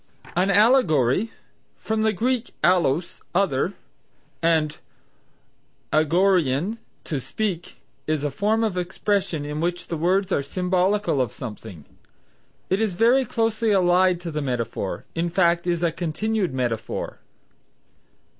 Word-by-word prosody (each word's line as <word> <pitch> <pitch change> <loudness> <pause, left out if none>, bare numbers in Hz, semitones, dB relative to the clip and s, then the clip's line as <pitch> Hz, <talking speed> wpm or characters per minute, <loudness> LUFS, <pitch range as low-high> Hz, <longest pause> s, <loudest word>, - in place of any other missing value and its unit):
An 185 +3 +2
Allegory 200 - +4 0.5
(from 220 0 -2
the 220 0 +3
Greek 240 +4 -1
allos, 175 -2 +2
other, 180 -2 +1 0.7
and 160 -2 +1 1.1
agoreuein, 170 - +2 0.2
to 150 - -3
speak), 180 - -4 0.3
is 155 -2 0
a 145 - -1
form 215 +9 +1
of 195 -5 0
expression 185 -3 -1
in 150 +1 -4
which 175 +1 -2
the 165 - -2
words 185 +4 +1
are - - +2
symbolical 180 +1 +1
of 120 -4 -1
something. 105 - -9 0.8
It 190 - +1
is 210 -5 0
very 245 +6 +4
closely 225 0 0
allied 185 -2 +3
to 170 -2 -5
the 150 0 -2
metaphor, 125 -3 -3
in 170 +1 -1
fact 170 0 +2
is 170 -1 0
a 170 - +2
continued 185 +5 -1
metaphor. 120 -4 -3
175 Hz, 125 wpm, -24 LUFS, 150-205 Hz, 1.1 s, Allegory